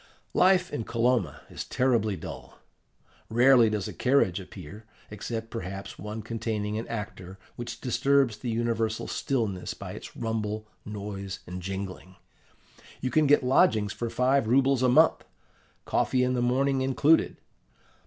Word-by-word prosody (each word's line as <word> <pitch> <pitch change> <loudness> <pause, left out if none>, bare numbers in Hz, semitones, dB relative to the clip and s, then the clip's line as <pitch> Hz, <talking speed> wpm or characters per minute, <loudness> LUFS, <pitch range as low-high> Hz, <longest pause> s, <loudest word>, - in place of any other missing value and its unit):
"Life 185 -2 +3
in 145 - -2
Kolomna 115 - 0
is - - -6
terribly 115 -5 +1
dull: 85 - -9 0.7
rarely 120 0 +6
does 105 -3 -2
a - - -6
carriage 125 -9 +2
appear, 95 +3 -11 0.2
except, 115 +2 -5
perhaps, 95 -3 -6
one 105 +2 -6
containing 110 -2 -3
an 115 - -6
actor, 100 -4 -6 0.2
which 120 0 -6
disturbs 135 -2 +2
the 120 - -4
universal 115 -1 -1
stillness 110 -9 -2
by - - -8
its - - -10
rumble, 110 -2 -3 0.2
noise, 100 -2 -6
and 90 +1 -7
jingling. 95 0 -6 0.8
You 130 - -2
can 155 -1 +3
get 145 -1 +5
lodgings 110 -5 +3
for 120 - -3
five 130 0 +2
rubles 135 +2 +3
a 130 - +4
month, 125 - +4 0.6
coffee 125 -1 +1
in 125 0 +1
the 125 - 0
morning 135 +2 +2
included. 140 +4 +3
115 Hz, 140 wpm, -27 LUFS, 105-130 Hz, 0.8 s, rarely